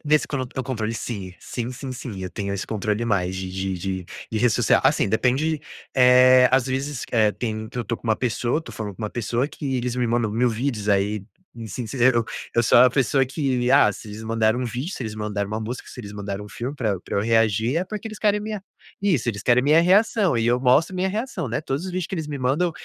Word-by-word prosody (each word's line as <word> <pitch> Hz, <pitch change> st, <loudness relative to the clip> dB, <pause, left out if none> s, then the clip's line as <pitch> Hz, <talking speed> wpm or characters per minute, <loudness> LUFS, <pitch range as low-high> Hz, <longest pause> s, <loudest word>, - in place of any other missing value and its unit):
nesse 150 Hz, 0 st, +2 dB
con 140 Hz, -3 st, -2 dB
o 130 Hz, +1 st, -5 dB
controle 115 Hz, -4 st, -3 dB
sim, 100 Hz, -6 st, -5 dB
sim, 120 Hz, 0 st, -4 dB
sim, 135 Hz, +1 st, -7 dB
sim, 115 Hz, -6 st, -7 dB
eu 90 Hz, -, -5 dB
tenho 100 Hz, -1 st, -4 dB
esse 100 Hz, -, -4 dB
controle 105 Hz, +1 st, -1 dB
mais 95 Hz, -4 st, 0 dB
de 95 Hz, 0 st, -4 dB
de 95 Hz, 0 st, -3 dB
de 95 Hz, 0 st, -4 dB, 0.3 s
de 110 Hz, -, -1 dB
rede 120 Hz, +2 st, +3 dB
social. -, -, +3 dB
Assim -, -, +3 dB
depende, 135 Hz, +8 st, +1 dB, 0.3 s
eh, 125 Hz, 0 st, +7 dB
às 130 Hz, -1 st, +4 dB
vezes, 135 Hz, +1 st, -3 dB
eh, 110 Hz, -3 st, +3 dB
tem 110 Hz, -2 st, -4 dB
que 125 Hz, -, -7 dB
eu 120 Hz, -, -2 dB
tô 115 Hz, -, -2 dB
com -, -, -25 dB
uma 110 Hz, -1 st, +3 dB
pessoa, 125 Hz, +4 st, 0 dB
tô -, -, -10 dB
falando 105 Hz, -3 st, -6 dB
com 110 Hz, -, -9 dB
uma 105 Hz, -, -2 dB
pessoa 120 Hz, +4 st, -1 dB
que 135 Hz, -5 st, -3 dB
eles 125 Hz, 0 st, -2 dB
me 125 Hz, -1 st, +1 dB
mandam 115 Hz, -2 st, +1 dB
1.000 120 Hz, +3 st, +2 dB
vídeos, 115 Hz, -2 st, -2 dB
aí 100 Hz, 0 st, +1 dB, 0.4 s
sim 120 Hz, +3 st, -5 dB
eu 120 Hz, -2 st, +4 dB, 0.3 s
eu 120 Hz, -, +4 dB
sou 120 Hz, -, +5 dB
a 125 Hz, -, +8 dB
pessoa 135 Hz, +1 st, +2 dB
que, 130 Hz, -3 st, -1 dB
ah, 135 Hz, -7 st, +6 dB
se 110 Hz, -, -11 dB
eles 105 Hz, +2 st, -8 dB
mandaram 110 Hz, +1 st, +1 dB
um -, -, -1 dB
vídeo, 125 Hz, -, -4 dB
se -, -, -6 dB
eles 110 Hz, -1 st, -5 dB
mandaram 105 Hz, -2 st, -3 dB
uma 110 Hz, +1 st, -3 dB
música, 120 Hz, +4 st, -6 dB
se -, -, -12 dB
eles 105 Hz, -3 st, -9 dB
mandaram 100 Hz, 0 st, -5 dB
um 105 Hz, -, -11 dB
filme 125 Hz, +7 st, -5 dB
pra 110 Hz, -5 st, 0 dB
eu 95 Hz, -, -2 dB
pra -, -, -5 dB
eu -, -, +2 dB
reagir, 115 Hz, +3 st, +2 dB
é 180 Hz, -, +1 dB
porque 215 Hz, +2 st, -6 dB
eles 215 Hz, -1 st, -8 dB
querem 210 Hz, -1 st, +3 dB
me 215 Hz, 0 st, -4 dB, 0.5 s
Isso, 165 Hz, -, +1 dB
eles 100 Hz, -3 st, -2 dB
querem 125 Hz, 0 st, +4 dB
a -, -, -4 dB
minha 155 Hz, +3 st, +6 dB
reação 195 Hz, -, +3 dB
e 115 Hz, -, +1 dB
eu 120 Hz, +1 st, +2 dB
mostro 140 Hz, +8 st, +3 dB
a -, -, -4 dB
minha 190 Hz, +1 st, +1 dB
reação, 210 Hz, -, -3 dB
né. 120 Hz, +5 st, -1 dB
Todos 140 Hz, 0 st, -3 dB
os -, -, -4 dB
vídeos 180 Hz, -2 st, -2 dB
que -, -, -5 dB
eles 160 Hz, -3 st, -4 dB
me 145 Hz, -, -4 dB
mandam 140 Hz, +8 st, +1 dB
120 Hz, 255 wpm, -23 LUFS, 110-135 Hz, 0.5 s, a